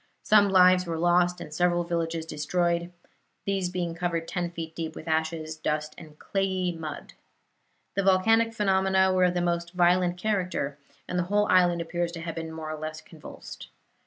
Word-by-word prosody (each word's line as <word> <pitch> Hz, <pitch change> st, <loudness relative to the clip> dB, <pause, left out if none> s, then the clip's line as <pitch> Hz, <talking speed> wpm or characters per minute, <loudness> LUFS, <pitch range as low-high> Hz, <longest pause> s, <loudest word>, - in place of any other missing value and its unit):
Some 205 Hz, -1 st, +5 dB
lives 185 Hz, -1 st, +5 dB
were 165 Hz, -1 st, -2 dB
lost, 175 Hz, +1 st, +2 dB
and 150 Hz, -, -8 dB
several 175 Hz, +1 st, +2 dB
villages 165 Hz, -1 st, -2 dB
were -, -, -20 dB
destroyed, 170 Hz, +3 st, -1 dB, 0.5 s
these 195 Hz, -2 st, -1 dB
being 175 Hz, -2 st, -3 dB
covered 170 Hz, -1 st, -2 dB
ten 175 Hz, -2 st, -2 dB
feet 165 Hz, -1 st, -7 dB
deep 160 Hz, -1 st, -5 dB
with 160 Hz, -, -9 dB
ashes, 160 Hz, 0 st, -1 dB
dust 150 Hz, 0 st, -2 dB
and 155 Hz, -3 st, -13 dB
clayey 190 Hz, -1 st, -1 dB
mud. 160 Hz, -3 st, -7 dB, 0.8 s
The 200 Hz, -, 0 dB
volcanic 225 Hz, +4 st, +3 dB
phenomena 190 Hz, -3 st, +2 dB
were 185 Hz, 0 st, +4 dB
of 180 Hz, 0 st, +1 dB
the 175 Hz, -, +1 dB
most 170 Hz, 0 st, -1 dB
violent 180 Hz, 0 st, +3 dB
character, 180 Hz, -8 st, -2 dB, 0.3 s
and 180 Hz, -, -1 dB
the -, -, +1 dB
whole 205 Hz, +3 st, +2 dB
island 175 Hz, -2 st, +4 dB
appears 170 Hz, +1 st, -2 dB
to 165 Hz, -, -6 dB
have 165 Hz, -1 st, -4 dB
been 160 Hz, -1 st, -6 dB
more 160 Hz, -1 st, -6 dB
or 155 Hz, -, -6 dB
less 155 Hz, 0 st, -5 dB
convulsed. 160 Hz, -1 st, -11 dB
175 Hz, 180 wpm, -27 LUFS, 165-185 Hz, 0.8 s, Some